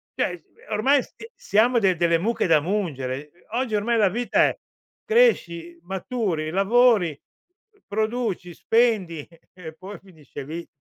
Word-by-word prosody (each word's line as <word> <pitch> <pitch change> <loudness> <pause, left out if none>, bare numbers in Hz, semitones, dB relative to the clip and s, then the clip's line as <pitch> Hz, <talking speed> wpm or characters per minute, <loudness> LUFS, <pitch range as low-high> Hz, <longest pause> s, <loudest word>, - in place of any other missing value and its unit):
Cioè, - - -1
s - - -35 0.3
ormai 260 +6 +3
sia 450 - -13
siamo 235 +4 +2
de 190 -4 +2
delle 170 0 +2
mucche 220 +5 0
da 165 -3 +5
mungere. 150 -8 -2 0.2
E 175 - -27
oggi 240 -1 -1
ormai 230 +3 +1
la 210 -3 +4
vita 240 +5 +2
è: - - -3 0.5
cresci, 175 - +2
maturi, 190 -4 -3
lavori, 195 - +3 0.7
produci, 215 -4 -2
spendi 210 -10 +1 0.3
e 165 -4 -10
poi 190 +5 -10
finisce 160 -7 -11
lì. 165 +5 -7
195 Hz, 140 wpm, -24 LUFS, 170-230 Hz, 0.7 s, da